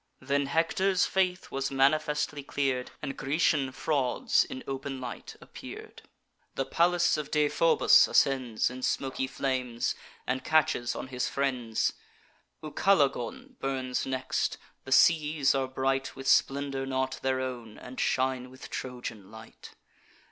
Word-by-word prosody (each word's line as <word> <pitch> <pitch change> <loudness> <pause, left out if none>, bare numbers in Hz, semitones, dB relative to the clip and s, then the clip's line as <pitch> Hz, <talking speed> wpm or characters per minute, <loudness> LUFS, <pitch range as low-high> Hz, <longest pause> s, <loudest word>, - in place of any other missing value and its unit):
Then 140 +1 0
Hector's 185 +5 +2
faith 185 -2 0
was 135 0 -2
manifestly 150 +2 +1
clear'd, 135 -2 -1
And 135 - -3
Grecian 140 -1 +1
frauds 145 - +1
in 260 -1 -8
open 135 0 -4
light 125 -2 -7
appear'd. - - -10 0.5
The 135 - -1
palace 175 +1 +2
of 150 -1 -4
Deiphobus 150 +2 +5
ascends 125 -4 +2
In 130 0 -8
smoky 130 0 -1
flames, 130 -3 -1 0.3
and 130 +1 -2
catches 155 -6 +2
on 130 - -6
his 125 -1 -2
friends. 125 -5 0 0.7
Ucalegon 155 - 0
burns 130 -2 -2
next: 130 0 -1 0.3
the 130 - -8
seas 150 -1 +4
are 135 -1 0
bright 135 +1 -1
With 135 0 -7
splendour 135 -1 +2
not 130 0 -2
their 130 0 0
own, 120 -4 -5
and 125 +1 -9
shine 130 -1 0
with 130 +1 -12
Trojan 120 -6 -6
light. 110 +1 -13
135 Hz, 125 wpm, -29 LUFS, 130-150 Hz, 0.7 s, Deiphobus